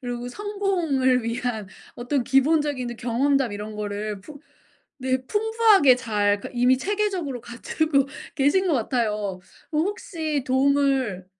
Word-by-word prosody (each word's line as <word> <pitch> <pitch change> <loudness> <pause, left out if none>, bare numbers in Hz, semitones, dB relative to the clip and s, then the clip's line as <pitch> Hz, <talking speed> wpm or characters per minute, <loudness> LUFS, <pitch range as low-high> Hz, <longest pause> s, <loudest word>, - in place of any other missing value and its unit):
그리고 245 -1 -5
성공을 345 - 0
위한 230 -3 -3 0.3
어떤 250 +2 -1
기본적인 270 -2 +1
경험담 250 +2 +1
이런 210 +1 -6
거를 205 -1 -4
풍 285 +8 -12 0.6
네 260 0 +1
풍부하게 430 - +4
잘 205 -5 0
그니까 245 - -9
이미 250 +1 +4
체계적으로 375 - -2
갖추고 275 +3 0 0.3
계신 305 +7 +2
것 - - +2
같아요. 215 -6 -1 0.3
혹시 315 -3 -2
도움을 265 -7 +1
260 Hz, 275 characters per minute, -24 LUFS, 235-305 Hz, 0.6 s, 풍부하게